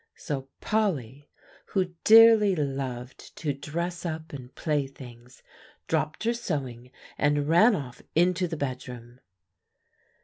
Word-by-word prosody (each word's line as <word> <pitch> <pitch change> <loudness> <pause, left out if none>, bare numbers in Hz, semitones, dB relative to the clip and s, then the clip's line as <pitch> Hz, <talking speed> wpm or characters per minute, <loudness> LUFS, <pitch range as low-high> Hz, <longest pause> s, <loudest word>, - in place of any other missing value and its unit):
So 135 -2 -5
Polly, 145 - -1 0.4
who 185 -3 -1
dearly 220 -3 +7
loved 135 -4 -5
to 150 -3 -2
dress 170 +5 -4
up 160 -2 -5
and 130 -2 -9
play 150 -3 -1
things, 125 -2 -14 0.4
dropped 155 +5 -1
her 230 +1 +1
sewing, 130 - -4 0.3
and 145 0 +1
ran 205 +8 +5
off 130 -7 -7
into 180 +2 +2
the 165 -1 -5
bedroom. 125 -3 -6
145 Hz, 115 wpm, -27 LUFS, 130-180 Hz, 0.4 s, dearly